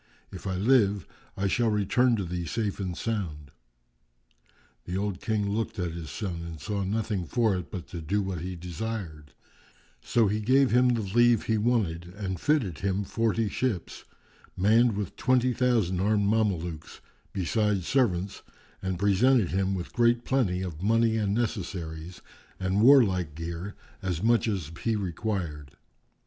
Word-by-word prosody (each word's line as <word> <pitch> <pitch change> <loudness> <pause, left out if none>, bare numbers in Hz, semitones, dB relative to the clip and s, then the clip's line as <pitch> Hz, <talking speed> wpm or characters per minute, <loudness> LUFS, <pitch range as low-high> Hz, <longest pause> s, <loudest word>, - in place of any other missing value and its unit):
If 95 - -7
I 95 - -1
live 100 -2 +3 0.3
I 95 - -1
shall 115 +4 +2
return 115 +4 +2
to 100 - -2
thee 90 0 -4
safe 105 +3 -2
and 90 -3 -3
sound." 80 - -3 1.3
The 90 +1 -3
old 100 -2 -2
King 105 -2 0
looked 110 +2 -2
at 90 -3 -2
his 80 -2 -7
son 90 -6 -4
and 85 -2 -7
saw 100 +7 -3
nothing 105 -2 -2
for 115 -2 +2
it 90 -2 -5
but 90 - -6
to 85 - -6
do 100 +6 0
what 95 -3 -3
he 90 +1 -5
desired; 85 -3 -6 0.7
so 115 -2 +2
he 105 +2 0
gave 130 +5 +3
him 125 +1 +5
the 115 - -2
leave 120 +3 +3
he 110 -1 +1
wanted 105 -8 0
and 95 -3 -4
fitted 115 - +1
him 100 +1 0
forty 115 +1 0
ships, 110 -4 -3 0.5
manned 110 +3 +4
with 105 -3 -4
twenty 130 -1 +2
thousand 115 -8 +1
armed 105 +1 +2
Mamelukes, 90 -7 -1 0.3
besides 100 0 0
servants, 100 -8 +1 0.4
and 95 -1 -2
presented 100 +3 +3
him 95 +1 0
with 90 -2 -6
great 120 0 +2
plenty 95 -9 +1
of 85 -3 -6
money 115 +2 +3
and 105 -2 0
necessaries 90 -7 -4 0.4
and 95 +2 +1
warlike 100 - +5
gear, 85 +4 -5 0.3
as 90 -3 -2
much 115 +1 +3
as 95 -8 -2
he 115 -1 +1
required. 85 -7 -4
100 Hz, 155 wpm, -27 LUFS, 90-115 Hz, 1.3 s, him